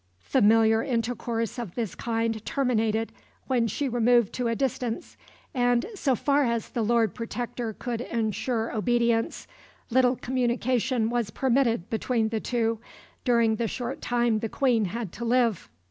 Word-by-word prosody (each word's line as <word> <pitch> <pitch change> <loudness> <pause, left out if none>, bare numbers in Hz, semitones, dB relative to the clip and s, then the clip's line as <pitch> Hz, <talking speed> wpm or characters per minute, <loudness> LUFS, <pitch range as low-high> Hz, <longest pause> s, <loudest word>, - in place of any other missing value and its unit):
Familiar 225 -2 +4
intercourse 230 -1 -2
of 215 -8 -6
this 225 -6 -2
kind 225 -2 -2
terminated 225 -5 0 0.3
when 245 -3 +1
she 275 +7 -2
removed 240 -2 +3
to 250 -2 -1
a 230 - 0
distance; 250 -3 -2 0.4
and, 245 -1 +2
so 280 -10 +1
far 285 +3 +2
as 235 -3 -1
the 235 - -2
Lord 225 -1 +2
Protector 240 -1 -4
could 235 +1 -4
ensure 230 0 -2
obedience, 235 0 +1 0.5
little 255 +1 +4
communication 245 -1 0
was 240 -3 0
permitted 235 -4 +1
between 225 0 0
the 225 0 -1
two 230 -1 -1 0.5
during 235 -3 +3
the 230 - 0
short 245 +2 -4
time 240 -2 +1
the 225 - -3
Queen 245 -5 +2
had 210 0 -4
to 235 - -7
live. 235 -4 +1
235 Hz, 145 wpm, -26 LUFS, 225-245 Hz, 0.5 s, Familiar